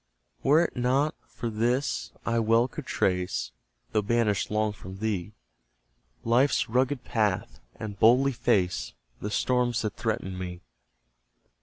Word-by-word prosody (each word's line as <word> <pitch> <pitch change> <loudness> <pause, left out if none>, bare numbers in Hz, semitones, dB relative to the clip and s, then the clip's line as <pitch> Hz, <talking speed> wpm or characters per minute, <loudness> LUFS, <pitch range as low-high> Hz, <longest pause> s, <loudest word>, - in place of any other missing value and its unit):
Were 155 +5 +5
't - - -5
not 135 +5 +2
for 120 - -5
this, 115 - 0
I 115 0 +1
well 115 +2 +3
could 140 +1 -8
trace 90 -1 0 0.4
(Though 105 - +2
banished 105 -3 +1
long 105 0 +1
from 95 -1 -10
thee) 105 -2 -2 0.9
Life's 125 +5 +3
rugged 130 +3 +1
path, 105 -5 -1 0.2
and 105 -2 -7
boldly 125 +5 +5
face 95 -7 0 0.3
The 105 - -3
storms 120 +1 +1
that 105 - -2
threaten 105 -5 -2
me. 90 -1 -6
110 Hz, 130 wpm, -27 LUFS, 100-125 Hz, 0.9 s, Were